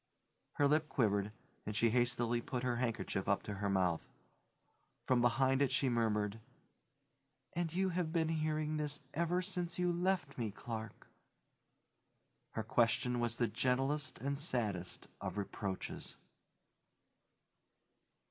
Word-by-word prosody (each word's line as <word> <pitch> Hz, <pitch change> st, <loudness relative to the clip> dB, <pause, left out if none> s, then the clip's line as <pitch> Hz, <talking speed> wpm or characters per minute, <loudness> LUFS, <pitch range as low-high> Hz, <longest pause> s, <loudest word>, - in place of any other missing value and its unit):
Her 145 Hz, -, +3 dB
lip 150 Hz, +1 st, +2 dB
quivered 105 Hz, -6 st, +2 dB, 0.3 s
and 105 Hz, -, -4 dB
she 115 Hz, +1 st, +4 dB
hastily 120 Hz, -1 st, +2 dB
put 125 Hz, +1 st, -3 dB
her 125 Hz, -1 st, +1 dB
handkerchief 115 Hz, -5 st, -1 dB
up 100 Hz, -, +2 dB
to 105 Hz, -, -4 dB
her 100 Hz, -, +1 dB
mouth. 90 Hz, -4 st, +1 dB, 0.9 s
From 125 Hz, -2 st, +3 dB
behind 130 Hz, +2 st, +3 dB
it 140 Hz, -2 st, +3 dB
she 135 Hz, 0 st, +2 dB
murmured, 110 Hz, -3 st, +1 dB, 1.1 s
"And 170 Hz, -1 st, -1 dB
you 190 Hz, +3 st, +1 dB
have 175 Hz, -2 st, -1 dB
been 160 Hz, -1 st, +2 dB
hearing 155 Hz, -1 st, 0 dB
this 150 Hz, -1 st, -2 dB
ever 170 Hz, +3 st, +1 dB
since 180 Hz, -3 st, -1 dB
you 180 Hz, -1 st, +2 dB
left 175 Hz, -6 st, 0 dB
me, 115 Hz, -2 st, 0 dB
Clark?" 110 Hz, +1 st, -6 dB, 1.5 s
Her 110 Hz, -, -2 dB
question 120 Hz, +2 st, +2 dB
was 120 Hz, -1 st, 0 dB
the 120 Hz, -, +2 dB
gentlest 135 Hz, +3 st, 0 dB
and 140 Hz, +3 st, -2 dB
saddest 105 Hz, -, -2 dB
of -, -, -4 dB
reproaches. 100 Hz, -1 st, -4 dB
125 Hz, 130 wpm, -36 LUFS, 110-155 Hz, 1.5 s, she